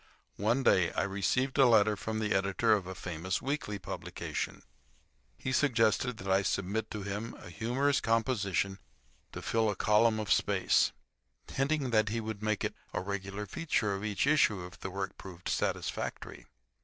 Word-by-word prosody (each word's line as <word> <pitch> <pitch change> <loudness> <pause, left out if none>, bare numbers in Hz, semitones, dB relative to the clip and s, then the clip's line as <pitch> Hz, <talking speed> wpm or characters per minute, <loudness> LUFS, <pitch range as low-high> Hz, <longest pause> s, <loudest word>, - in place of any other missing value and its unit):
One 115 +6 +1
day 90 -8 +4
I - - +1
received 100 +8 0
a 135 - +8
letter 110 -2 +5
from 110 +2 -4
the 110 -1 0
editor 100 +4 +2
of 100 -4 0
a 95 - -6
famous 90 0 -3
weekly 135 -6 -2
publication. 90 -2 -5 0.7
He 130 - -3
suggested 125 -3 +2
that 95 - -8
I 95 +1 +4
submit 100 +3 -1
to 105 -2 -5
him 105 +3 -4
a 85 - -11
humorous 135 +8 +1
composition 105 -4 0 0.5
to - - -7
fill 110 -1 +2
a 105 - -1
column 110 +2 +3
of 105 - +2
space; - - +3 0.6
hinting 135 -1 0
that 110 -2 +3
he 115 +2 -1
would 110 -2 -5
make 110 -1 0
it - - -1 0.2
a - - +1
regular 100 +1 -4
feature 110 - 0
of 100 +1 -4
each 105 +1 0
issue 110 -11 +3
if 90 +2 -12
the - - -5
work 95 +1 -5
proved 90 -2 -9
satisfactory. - - -3
105 Hz, 170 wpm, -31 LUFS, 95-115 Hz, 0.7 s, a